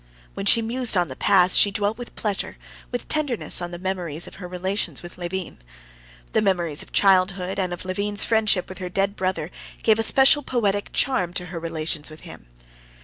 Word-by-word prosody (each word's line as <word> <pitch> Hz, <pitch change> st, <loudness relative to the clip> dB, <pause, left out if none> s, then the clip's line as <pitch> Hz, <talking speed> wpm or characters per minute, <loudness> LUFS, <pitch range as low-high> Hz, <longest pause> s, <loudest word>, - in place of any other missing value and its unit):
When 195 Hz, -, -5 dB
she 230 Hz, +3 st, +6 dB
mused 235 Hz, -2 st, +3 dB
on 175 Hz, -3 st, +1 dB
the 130 Hz, -, -7 dB
past, 185 Hz, +1 st, +3 dB
she 205 Hz, -, +6 dB
dwelt 205 Hz, +3 st, -2 dB
with 245 Hz, -, -9 dB
pleasure, 205 Hz, -3 st, -3 dB, 0.3 s
with 245 Hz, -1 st, -4 dB
tenderness, 285 Hz, -11 st, -1 dB
on 175 Hz, -, -4 dB
the 175 Hz, -, -7 dB
memories 175 Hz, -4 st, -2 dB
of -, -, -11 dB
her 180 Hz, -, -6 dB
relations 185 Hz, +3 st, -3 dB
with 175 Hz, -, -10 dB
Levin. 180 Hz, -, -5 dB, 0.7 s
The -, -, +3 dB
memories 175 Hz, -7 st, 0 dB
of -, -, -9 dB
childhood 190 Hz, -1 st, +2 dB
and 185 Hz, -2 st, -1 dB
of 175 Hz, +1 st, -6 dB
Levin's 200 Hz, +2 st, -1 dB
friendship 215 Hz, -5 st, +2 dB
with 185 Hz, -, -9 dB
her 180 Hz, -1 st, -5 dB
dead 195 Hz, +2 st, -1 dB
brother 185 Hz, -3 st, -2 dB, 0.3 s
gave 220 Hz, 0 st, +3 dB
a -, -, +2 dB
special 270 Hz, +5 st, +6 dB
poetic 205 Hz, -7 st, -1 dB
charm 185 Hz, -11 st, 0 dB
to 180 Hz, -, -3 dB
her 170 Hz, -, -4 dB
relations 160 Hz, -2 st, -3 dB
with 155 Hz, 0 st, -12 dB
him. -, -, -12 dB
190 Hz, 195 wpm, -23 LUFS, 175-210 Hz, 0.7 s, she